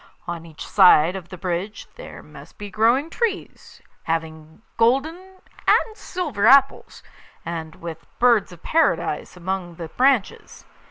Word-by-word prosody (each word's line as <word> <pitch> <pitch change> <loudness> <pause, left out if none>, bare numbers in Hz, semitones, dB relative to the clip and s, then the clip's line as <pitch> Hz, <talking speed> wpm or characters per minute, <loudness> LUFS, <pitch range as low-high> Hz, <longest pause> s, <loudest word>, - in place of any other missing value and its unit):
On 170 -1 -6
each 160 -1 -10
side 180 -3 +5
of 180 -3 -8
the 185 - -9
bridge 180 +4 -4
there - - -11
must - - -15
be 205 -1 -8
growing 235 +9 +2
trees, 450 -2 -4 0.2
having 160 +2 -5
golden 270 +8 +2 0.5
and 440 - +3
silver 300 - -2
apples, 275 +1 +3 0.4
and 160 -2 -6
with 165 -1 -9
birds 235 -5 +3
of 175 -1 -15
Paradise 325 - 0
among 180 -1 -4
the 165 -1 -8
branches. 255 - 0
195 Hz, 130 wpm, -22 LUFS, 170-260 Hz, 0.5 s, side